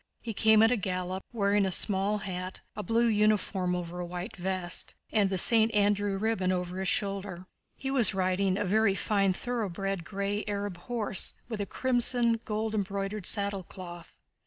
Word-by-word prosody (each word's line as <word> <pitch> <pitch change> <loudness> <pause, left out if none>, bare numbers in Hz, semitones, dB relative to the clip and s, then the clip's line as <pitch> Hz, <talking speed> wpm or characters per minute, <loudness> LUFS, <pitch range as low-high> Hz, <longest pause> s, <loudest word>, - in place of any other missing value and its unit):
He 230 - -5
came 220 +1 +5
at 225 - +5
a 250 - +2
gallop, 185 -1 -3
wearing 205 -3 +2
a 190 - 0
small 200 +2 +2
hat, 185 -2 -5
a 210 - -3
blue 230 +4 +2
uniform 210 -4 +2
open - - -1
over 175 +1 -7
a 175 - -3
white 180 +4 -6
vest, 185 -1 -2 0.2
and 205 -3 +3
the 190 - -1
St. 225 +3 +5
Andrew 205 -1 +2
ribbon 195 -3 0
over 180 0 -2
his 190 - -1
shoulder. 195 -2 -1 0.3
He 270 - -4
was 240 -7 +3
riding 185 0 +1
a 205 - -1
very 205 +1 +3
fine 195 -2 +1
thoroughbred 195 -5 -3
gray 200 +4 -2
Arab 200 -3 -3
horse 210 0 -2
with 220 -3 -4
a 200 - -3
crimson 245 -1 +2
gold 215 0 -2
embroidered 200 -1 -2
saddlecloth. 185 -4 -4
200 Hz, 170 wpm, -29 LUFS, 185-215 Hz, 0.3 s, came